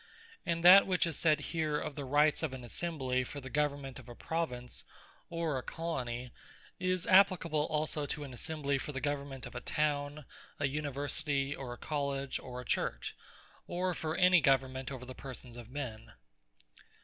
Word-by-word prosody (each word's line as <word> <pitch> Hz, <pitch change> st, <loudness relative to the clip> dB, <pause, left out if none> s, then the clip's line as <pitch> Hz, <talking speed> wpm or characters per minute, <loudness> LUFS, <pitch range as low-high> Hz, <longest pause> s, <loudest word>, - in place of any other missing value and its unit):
And 170 Hz, 0 st, 0 dB
that 190 Hz, +2 st, +10 dB
which 185 Hz, -1 st, +3 dB
is 165 Hz, -3 st, -2 dB
said 155 Hz, 0 st, +3 dB
here, 155 Hz, -2 st, +1 dB
of -, -, -4 dB
the 145 Hz, -, -5 dB
Rights 145 Hz, +3 st, +4 dB
of 150 Hz, -5 st, -2 dB
an 130 Hz, -, -8 dB
Assembly, 130 Hz, -2 st, -1 dB
for 145 Hz, +3 st, -6 dB
the 130 Hz, -1 st, -8 dB
government 140 Hz, -3 st, -1 dB
of 125 Hz, -1 st, -13 dB
a 120 Hz, -, -9 dB
Province, 125 Hz, -7 st, -3 dB, 0.5 s
or 165 Hz, -5 st, -1 dB
a -, -, -5 dB
Colony, 125 Hz, -7 st, -3 dB, 0.5 s
is 185 Hz, -1 st, 0 dB
appliable 180 Hz, -6 st, +5 dB
also 150 Hz, -1 st, -1 dB
to 150 Hz, 0 st, -3 dB
an 135 Hz, -3 st, -8 dB
Assembly 140 Hz, +1 st, -1 dB
for 150 Hz, -, -5 dB
the 135 Hz, -, -2 dB
Government 140 Hz, -2 st, -3 dB
of -, -, -8 dB
a -, -, -5 dB
Town, 145 Hz, -1 st, -1 dB, 0.3 s
or 145 Hz, -, +2 dB
University, 145 Hz, 0 st, -1 dB
or 130 Hz, -3 st, -6 dB
a 120 Hz, -, -6 dB
College, 140 Hz, -2 st, -2 dB
or 125 Hz, -1 st, -7 dB
a 125 Hz, -, -7 dB
Church, -, -, -1 dB, 0.5 s
or 180 Hz, +1 st, 0 dB
for 160 Hz, 0 st, -2 dB
any 180 Hz, -1 st, +7 dB
other -, -, -6 dB
Government 130 Hz, -1 st, +2 dB
over 130 Hz, -2 st, -6 dB
the 130 Hz, -, -7 dB
persons 130 Hz, -2 st, -9 dB
of 120 Hz, -1 st, -9 dB
men. 125 Hz, -5 st, -6 dB
145 Hz, 180 wpm, -33 LUFS, 130-160 Hz, 0.5 s, that